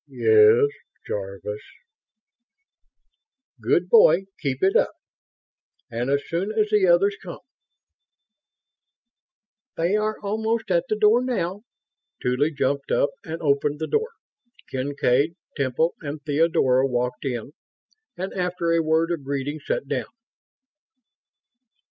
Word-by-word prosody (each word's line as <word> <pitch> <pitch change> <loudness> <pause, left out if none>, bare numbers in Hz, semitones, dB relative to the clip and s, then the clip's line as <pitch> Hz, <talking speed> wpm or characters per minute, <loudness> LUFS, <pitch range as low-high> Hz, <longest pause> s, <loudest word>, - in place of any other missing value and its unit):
"Yes... 440 0 +5 0.4
Jarvis...." 100 +1 -5 2.0
"Good - - +1
boy! 460 - +6 0.2
Keep 135 -2 -3
it 190 - +3
up! - - +2 1.0
And 120 +3 -2
as 140 0 +1
soon 180 +5 -2
as 215 -1 0
the 210 -3 +4
others 195 +4 +4
come 175 -3 -8 1.0
..." 240 -4 -61
"They 170 +5 +1
are 215 0 -1
almost 220 +1 -2
at 170 -1 +2
the 215 - +1
door 215 +3 +4
now." 205 -6 -2 0.6
Tuly 130 +5 0
jumped 140 -1 -1
up 140 - +2
and 165 +1 -6
opened 145 0 +1
the 160 - -3
door. 450 - 0 0.6
Kincaid, 140 +3 0 0.2
Temple 140 +4 0
and 150 0 -5
Theodora 145 -4 +2
walked 125 -1 -2
in 125 -1 -4 0.7
and, 190 +2 -4
after 180 -2 -1
a 165 0 +3
word 160 +1 +1
of 165 -5 -3
greeting, 140 +2 -3
sat - - -3
down. - - -3
165 Hz, 120 wpm, -24 LUFS, 140-210 Hz, 2.0 s, boy